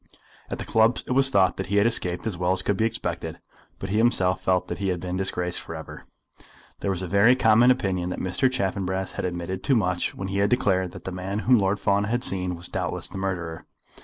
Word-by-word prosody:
At - - -4
the - - -6
clubs 110 +2 +2
it - - -6
was 135 +1 +4
thought 95 -7 +3
that 95 - -3
he 100 - -1
had 100 - +4
escaped 90 -7 0
as 110 -5 -2
well 90 +1 +1
as 95 - -2
could 100 - +1
be 110 - +1
expected; 85 -7 -3 0.4
but 95 - -6
he 105 - +1
himself 95 -6 +2
felt 90 -1 +1
that 85 - -5
he 100 - -1
had 90 -1 -1
been 90 +1 -4
disgraced 90 -2 -2
for 80 - -8
ever. 80 -1 -10 0.7
There - - -2
was 95 -1 -2
a - - -3
very 100 +7 +5
common 115 0 +5
opinion 95 -8 +1
that - - -4
Mr. 95 +8 0
Chaffanbrass 95 -4 -2
had - - -4
admitted 90 +1 -4
too 140 - +3
much 90 -5 0
when 95 0 -5
he 100 0 -1
had 100 0 +3
declared 95 -6 +1
that - - -10
the 95 - -5
man 95 +2 -4
whom 125 -2 +5
Lord 100 +1 +1
Fawn 100 +1 +1
had 120 +3 -1
seen 90 -2 +1
was 85 +1 -7
doubtless - - -3
the 95 - -6
murderer. 85 -4 -4
95 Hz, 240 wpm, -25 LUFS, 90-105 Hz, 0.7 s, very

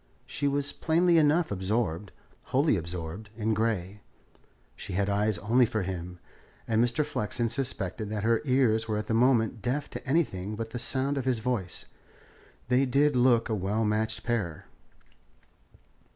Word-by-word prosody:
She 145 - -2
was 140 0 0
plainly 170 +1 +3
enough 155 0 +3
absorbed, 100 -2 -1 0.3
wholly 140 0 +2
absorbed, 85 +3 -6
in 110 0 0
Grey. 105 -3 -1 0.7
She 95 - -7
had 100 +2 0
eyes 105 0 +1
only 115 +6 +3
for 110 -2 -2
him, 90 -1 -5 0.5
and 110 0 +3
Mr. 120 +5 +1
Flexen 115 -4 -1
suspected 110 -4 -2
that 105 -1 -3
her 115 0 +2
ears 125 -5 +2
were 110 -1 -1
at 105 - -3
the 110 - -2
moment 115 -2 +2
deaf 135 +4 -2
to - - -7
everything 110 - 0
but 115 +1 -5
the 120 - -4
sound 135 +4 +1
of 130 - -4
his 130 -2 +1
voice. 110 -5 -3 0.8
They 125 +2 +3
did 140 +2 +3
look 120 -2 +4
a 110 - -2
well 105 +2 0
matched 110 +1 -1
pair. 100 -10 -2
115 Hz, 155 wpm, -28 LUFS, 105-130 Hz, 0.8 s, look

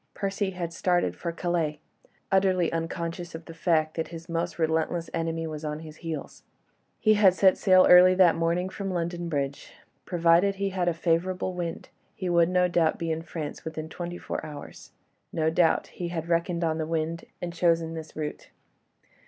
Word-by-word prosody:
Percy 195 0 -1
had 175 -3 -5
started 175 0 +1
for 170 - -4
Calais, 165 -3 -1 0.5
utterly 190 -3 +2
unconscious 165 +1 -4
of 165 0 -8
the 165 - -9
fact 160 -2 +1
that 160 - -3
his 165 0 -9
most 170 0 -2
relentless 160 +1 0
enemy 165 0 -2
was 155 -1 -6
on 150 0 -4
his 155 -1 -10
heels. 160 -4 -6 0.6
He 215 - +4
had 200 -3 +5
set 190 -1 +5
sail 185 -2 +5
early 180 +1 +8
that 180 -3 +6
morning 170 +2 0
from 195 +1 -5
London 175 -1 -2
Bridge. 140 -2 -3 0.3
Provided 175 +3 +3
he 195 0 -1
had 185 -2 -1
a 175 - +3
favourable 180 +3 0
wind, 175 -2 -5 0.3
he 185 - -3
would 170 -1 +4
no 180 0 +3
doubt 170 -2 +2
be 165 -1 -2
in 160 0 -2
France 160 -2 -6
within 160 0 -6
twenty 175 +1 -6
four - - -5
hours; 150 -2 -10 0.4
no 160 -1 +1
doubt 165 0 +3
he 175 - -6
had 170 -1 -4
reckoned 170 0 0
on 160 -1 0
the 155 - -2
wind 165 +1 -2
and 175 -1 -5
chosen 165 -1 +1
this 160 -1 -8
route. 150 -1 -5
170 Hz, 180 wpm, -27 LUFS, 160-180 Hz, 0.6 s, early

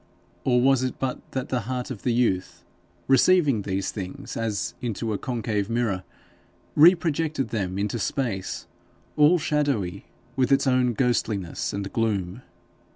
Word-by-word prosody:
Or 125 -2 +3
was 135 0 +4
it 130 -1 -2
but 130 -1 -2
that 130 -1 -3
the 125 - 0
heart 125 0 -3
of 110 - -6
the 125 - 0
youth, 115 -6 0 0.4
receiving 140 - +4
these 95 -1 -2
things 95 -3 -7
as 110 -5 -2
into 115 -2 -2
a 100 - -3
concave 110 -4 -2
mirror, 115 -6 0 0.7
reprojected 160 -3 +4
them 95 -4 -2
into 105 +3 -1
space, 110 -10 -2 0.5
all 150 +4 +6
shadowy 140 - -1 0.3
with 130 0 +1
its 135 0 +4
own 125 -2 +2
ghostliness 110 -7 -1
and 100 -1 -5
gloom? 105 -2 -1
120 Hz, 140 wpm, -25 LUFS, 100-135 Hz, 0.7 s, all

